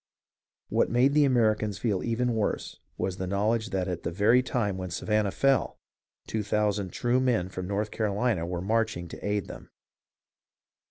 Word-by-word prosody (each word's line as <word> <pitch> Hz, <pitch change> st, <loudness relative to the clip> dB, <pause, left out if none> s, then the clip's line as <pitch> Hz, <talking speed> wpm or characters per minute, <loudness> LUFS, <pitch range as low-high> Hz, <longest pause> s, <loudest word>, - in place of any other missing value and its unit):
What -, -, +2 dB
made 125 Hz, +4 st, +3 dB
the 150 Hz, -1 st, +5 dB
Americans 110 Hz, -5 st, +2 dB
feel 105 Hz, -5 st, 0 dB
even 120 Hz, +1 st, 0 dB
worse 110 Hz, -2 st, -2 dB, 0.2 s
was 95 Hz, -1 st, -2 dB
the 95 Hz, -, -3 dB
knowledge 110 Hz, +4 st, 0 dB
that 95 Hz, -1 st, -1 dB
at 90 Hz, -2 st, -3 dB
the -, -, -2 dB
very 105 Hz, +8 st, +4 dB
time 115 Hz, -6 st, -1 dB
when 95 Hz, -1 st, -5 dB
Sa 85 Hz, -, -5 dB
vannah 105 Hz, -1 st, +2 dB
fell, 135 Hz, +6 st, +1 dB, 0.5 s
two 110 Hz, -, -2 dB
thousand 105 Hz, -2 st, 0 dB
true 120 Hz, +5 st, +1 dB
men 120 Hz, -8 st, +1 dB
from 95 Hz, -1 st, -5 dB
North 105 Hz, +2 st, -2 dB
Carolina 105 Hz, -2 st, 0 dB
were 90 Hz, 0 st, -3 dB
marching 110 Hz, -3 st, 0 dB
to -, -, -10 dB
aid 105 Hz, -1 st, -1 dB
them. -, -, -10 dB
105 Hz, 170 wpm, -28 LUFS, 95-115 Hz, 0.5 s, the